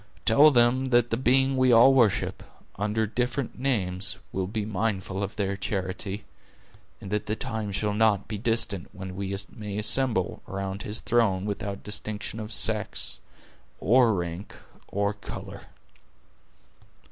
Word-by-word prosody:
Tell 140 +7 +7
them, 125 0 +3
that 120 -2 +2
the - - +2
Being 130 +2 +3
we 130 -1 +4
all 120 +3 +7
worship, 120 -7 +2 0.3
under 105 +2 0
different 125 +3 -2
names, 95 -7 0
will 95 -1 -2
be 105 +1 -3
mindful 100 -2 -2
of 100 +1 -4
their 100 -2 -1
charity; 95 0 -3 0.8
and 95 - -9
that 105 0 -1
the 110 - -1
time 110 -2 -4
shall 105 +1 -1
not 105 -2 +2
be 105 -3 -5
distant 115 -5 0
when 95 -1 -7
we 100 0 -3 0.2
may 105 -2 -6
assemble 105 -2 +2
around 95 0 -4
His 105 +2 -2
throne 105 -5 +1
without 100 -1 -4
distinction 105 +1 -2
of 110 0 -6
sex, 110 -2 -1 0.6
or 120 -1 +4
rank, 85 +2 -5 0.3
or 100 +1 -1
color." 100 - -9
105 Hz, 140 wpm, -26 LUFS, 100-115 Hz, 0.8 s, Tell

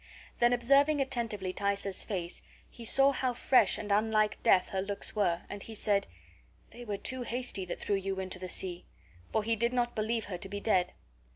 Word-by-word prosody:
Then, 240 0 +4
observing 275 +5 +4
attentively 230 -8 -1
Thaisa's 200 -1 0
face, 180 -4 -3 0.3
he 235 - -12
saw 270 +4 +4
how 255 -2 -1
fresh 235 -4 +3
and 210 -1 -5
unlike 215 +1 +2
death 185 - +4
her 190 - -1
looks 200 +2 -1
were, 175 -5 +1
and 205 0 -7
he 225 - -8
said, 205 -1 +1 0.6
"They 240 - -10
were 210 -4 -3
too 255 +5 0
hasty 245 -5 -2
that 175 - -6
threw 200 - 0
you 195 0 -3
into 185 -1 -4
the 185 - -5
sea"; 180 -1 -1 0.5
for 220 - +1
he 225 +1 +1
did 235 +3 0
not 240 -1 0
believe 220 0 -1
her 180 -3 -6
to 195 - -5
be 205 +1 -4
dead. 190 -4 +1
210 Hz, 195 wpm, -31 LUFS, 195-240 Hz, 0.6 s, Then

